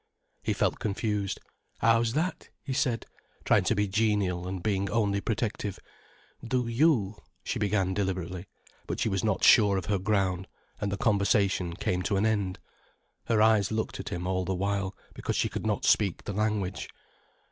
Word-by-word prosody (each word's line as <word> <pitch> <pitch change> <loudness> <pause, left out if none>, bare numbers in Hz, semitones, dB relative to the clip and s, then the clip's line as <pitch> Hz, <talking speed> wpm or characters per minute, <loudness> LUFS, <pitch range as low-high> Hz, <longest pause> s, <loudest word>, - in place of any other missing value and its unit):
He - - 0
felt - - 0
confused. 105 -1 -2 0.4
"How's 115 0 +3
that?" 165 +6 -2
he 135 - -3
said, 125 -3 0 0.4
trying - - +4
to - - +2
be 105 0 +1
genial 100 -4 0
and 95 -1 -5
being 100 -2 0
only 100 -3 +1
protective. 105 -3 -2 0.7
"Do 125 +1 0
you——?" 115 -5 +2 0.3
she - - -2
began 95 -2 +1
deliberately. 95 -2 -3 0.4
But - - -3
she 115 - +1
was 95 -2 -1
not 105 -4 0
sure 100 -3 +6
of 95 - -3
her 100 -2 0
ground, 95 -2 0 0.3
and 100 -1 -2
the 100 - -2
conversation 100 -4 +2
came 90 -1 -1
to 100 +2 0
an 100 - +2
end. 100 -4 0 0.7
Her 110 -2 +3
eyes 110 -3 +4
looked 110 0 -2
at - - -5
him 90 0 -4
all 95 0 0
the 95 +1 -1
while, 100 0 -1 0.2
because - - -3
she - - +1
could - - -4
not - - 0
speak 100 -5 +2
the 105 - -4
language. 105 -2 -1
100 Hz, 170 wpm, -28 LUFS, 95-110 Hz, 0.7 s, sure